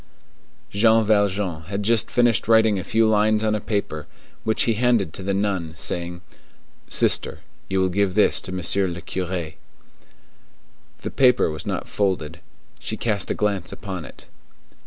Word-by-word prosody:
Jean 110 +2 +4
Valjean 100 -5 +1
had 100 +3 -4
just 115 0 +2
finished 120 -4 +2
writing 110 -3 +4
a - - -4
few 110 +4 +2
lines 110 0 +2
on 110 -1 +1
a 105 - 0
paper, 100 -8 -3 0.4
which 110 - +2
he 115 - +2
handed 115 -7 +1
to - - -8
the 95 +1 -2
nun, 95 -5 -1
saying, 85 +1 -3 0.7
"Sister, - - +2 0.3
you 95 0 0
will 95 0 +2
give 95 0 0
this - - +3
to 90 - -7
Monsieur 95 +2 +1
le 85 -1 -5
Curé." 90 -2 -4 1.4
The - - -5
paper 125 -9 +3
was 75 - -6
not - - -3
folded. 90 -5 -2 0.4
She - - -4
cast 105 -4 -1
a - - 0
glance 100 -2 -1
upon 95 -6 -6
it. - - -13
100 Hz, 155 wpm, -23 LUFS, 90-110 Hz, 1.4 s, Jean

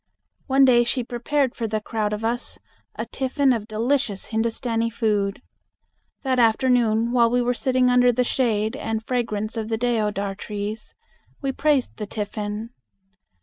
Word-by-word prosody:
One 270 0 +5
day 240 -2 +5
she 245 +1 -1
prepared 250 +3 -1
for 230 - -3
the 215 0 -1
crowd 210 0 -2
of 210 +1 -3
us 240 +2 -2 0.4
a - - -3
tiffin 270 0 +1
of 220 -3 -3
delicious 230 -1 -1
Hindustani 230 +1 -1
food. 210 -2 -1 0.8
That 260 -2 +1
afternoon 230 -1 +3
while 235 -2 +4
we 245 +1 +2
were 245 0 +1
sitting 255 0 +1
under 250 0 +5
the 250 +1 +1
shade 225 -3 0
and 225 -6 -3
fragrance 225 -3 -2
of 220 -1 -3
the 225 - 0
deodar 210 -4 0
trees, 210 +2 -6 0.5
we 270 - 0
praised 285 -2 +1
the 210 - -5
tiffin. 210 +1 -4
230 Hz, 150 wpm, -23 LUFS, 215-250 Hz, 0.8 s, One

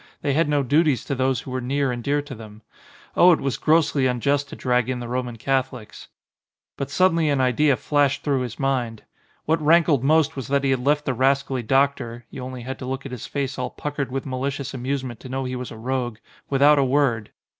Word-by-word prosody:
They 140 - +1
had 160 +1 +2
no 145 -1 +2
duties 145 0 +2
to - - -2
those 130 -1 0
who 130 - -9
were 130 0 -2
near 135 +1 0
and 120 -1 -4
dear 145 +2 0
to 145 - -9
them. 110 -1 -12 0.5
Oh, 180 - +7
it - - 0
was 135 -4 -2
grossly 155 -4 +2
unjust 140 +3 0
to - - -8
drag 125 -1 0
in 125 -1 -2
the 120 - -6
Roman 125 -1 -3
Catholics. 130 -2 -3 0.7
But 140 - -4
suddenly 165 -1 +2
an 140 -2 +1
idea 130 +2 +3
flashed 145 +3 +1
through 140 -3 +1
his 125 -2 -5
mind. 125 -5 -1 0.4
What 160 +1 +1
rankled 155 -3 +4
most 155 +1 +3
was 135 -5 -5
that 140 0 +1
he 135 - +2
had 130 -2 0
left 150 +2 +2
the 130 - 0
ras 135 +3 +2
cally 130 -2 -3
doctor 120 -1 0
(you 130 - -7
only 130 -1 -7
had 130 +2 -6
to - - -6
look 135 +1 -4
at 135 - -6
his 125 -4 -6
face 140 -2 -3
all 125 0 -2
puckered 145 -3 -4
with 135 0 -3
malicious 135 +1 -3
amusement 130 -2 -3
to 130 - -10
know 135 +1 -2
he 130 0 -4
was 125 0 -5
a 115 - -10
rogue) 120 -1 -2 0.3
without 145 +1 +5
a - - +4
word. 130 -5 +1
135 Hz, 225 wpm, -23 LUFS, 125-145 Hz, 0.7 s, Oh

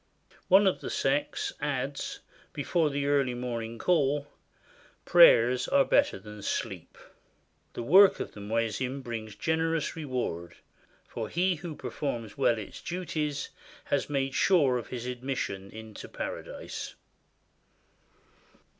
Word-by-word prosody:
One 195 +2 +6
of 190 - +2
the - - -5
sects 270 - 0
adds, 140 0 -3 0.3
before 155 +2 +1
the 140 0 -2
early 140 -3 +2
morning 115 -2 -4
call, 145 -2 +2 0.8
"Prayers 130 -8 +6
are 280 0 +4
better 285 0 +3
than 105 -1 -11
sleep!" - - -4 0.8
The - - -4
work 190 +10 +7
of - - -5
a - - -9
muezzin 115 +5 -2
brings 110 -3 -6
generous 160 +7 0
reward, 125 - -4 0.5
for - - -5
he 180 +2 +2
who 160 -1 -7
performs 120 -10 -4
well 115 - +2
its 105 - -8
duties 155 -5 -3 0.3
has 140 - -1
made 135 -2 -1
sure 140 -10 +3
his 120 +1 -7
admission 125 -6 -4
into 110 0 -10
Paradise. - - -6
135 Hz, 120 wpm, -29 LUFS, 115-160 Hz, 0.8 s, work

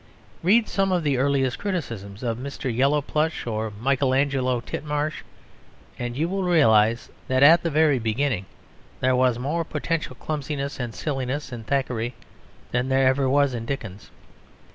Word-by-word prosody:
Read 215 +6 +4
some 195 -1 0
of 180 -2 +1
the 140 -4 +1
earliest 135 -1 +1
criticisms 115 - -4
of 115 -1 -2
Mr. 130 -2 -4
Yellowplush 150 +4 +1
or 110 -1 -2
Michael 130 +1 +1
Angelo 135 -3 +1
Titmarsh 150 +5 -3 0.8
and 120 0 -4
you 160 +3 +1
will 195 +2 -2
realise 115 - +3 0.2
that 130 +1 +3
at 165 +4 +8
the 170 - -1
very 150 -3 +3
beginning 115 -2 -1 0.5
there 130 0 +2
was 125 -2 +3
more 150 +7 -1
potential 165 0 -3
clumsiness 145 -2 -4
and 120 -3 -4
silliness 135 -1 -3
in 120 -2 -6
Thackeray 125 -2 -1 0.6
than 125 +2 0
there 135 0 +3
ever 130 0 +3
was 140 -1 +3
in 115 -1 -5
Dickens. 110 -8 -6
135 Hz, 150 wpm, -24 LUFS, 120-150 Hz, 0.8 s, at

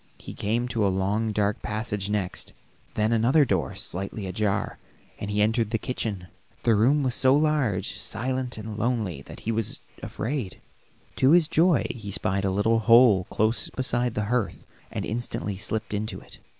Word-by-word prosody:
He - - -9
came 115 +4 -1
to 115 -3 0
a 100 - +3
long 100 +4 0
dark 105 0 0
passage 105 -2 -3
next, 105 -3 -2 0.4
then 110 +1 +1
another 120 +6 +4
door 95 - -1
slightly 100 +3 -4
ajar, 100 +2 -1 0.4
and 100 - -4
he 105 0 +2
entered 110 0 +1
the 115 - 0
kitchen. 110 -6 -4 0.4
The 115 - +4
room 130 +8 +3
was 130 -2 +1
so 130 +1 +5
large, 135 -11 0
silent 125 +3 -2
and 110 0 -6
lonely 110 - -1
that - - -11
he 115 - -2
was 115 +4 -1 0.2
afraid; 115 -1 -4 0.6
to 130 - +4
his 170 -3 +5
joy, 165 0 +3
he 110 -4 -8
spied 95 0 0
a - - +2
little 105 +4 +2
hole 115 -4 +6
close 110 +2 +1
beside 120 -2 0
the 105 - -1
hearth 120 0 -2 0.3
and - - -3
instantly 110 -3 -3
slipped 110 +2 -3
into 105 +1 -3
it. - - -15
110 Hz, 170 wpm, -26 LUFS, 100-125 Hz, 0.6 s, hole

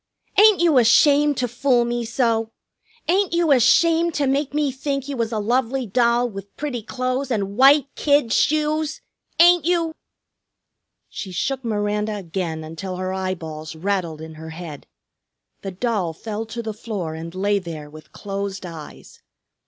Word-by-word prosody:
"Ain't 420 -3 +6
you 320 -6 +5
ashamed 285 +4 +4
to 250 - 0
fool 245 0 +2
me 240 0 -2
so? 225 -2 0 0.6
Ain't 375 +1 +2
you 340 -2 +2
ashamed 330 +6 +4
to 290 - +1
make 275 +1 0
me 295 -1 0
think 275 +1 -3
you 285 - -4
was 230 -2 -2
a 220 - -2
lovely 250 +4 0
doll 235 +3 +2
with 195 -3 -10
pretty 280 -6 -3
clo'es 255 +4 -3
and 200 -4 -2
white 275 +3 +6
kid 285 -6 +2
shoes? 310 0 +1 0.4
Ain't 350 -1 +7
you?" 335 -1 +1 1.1
She 190 - -7
shook 265 +8 -2
Miranda 210 -1 -1
again 170 -4 -4
until 165 +4 -6
her 185 +1 -3
eyeballs 160 -5 -5
rattled 170 -3 -2
in 160 0 -8
her 160 - -8
head. 160 -3 -9 0.7
The 195 - -5
doll 190 -3 -2
fell 220 +5 -5
to 230 +1 -6
the 220 -1 -4
floor 205 -7 -5
and 165 +2 -8
lay 200 +2 +1
there 160 -5 -7
with 150 0 -14
closed 195 -1 -5
eyes. 165 -3 -11
230 Hz, 155 wpm, -22 LUFS, 190-275 Hz, 1.1 s, Ain't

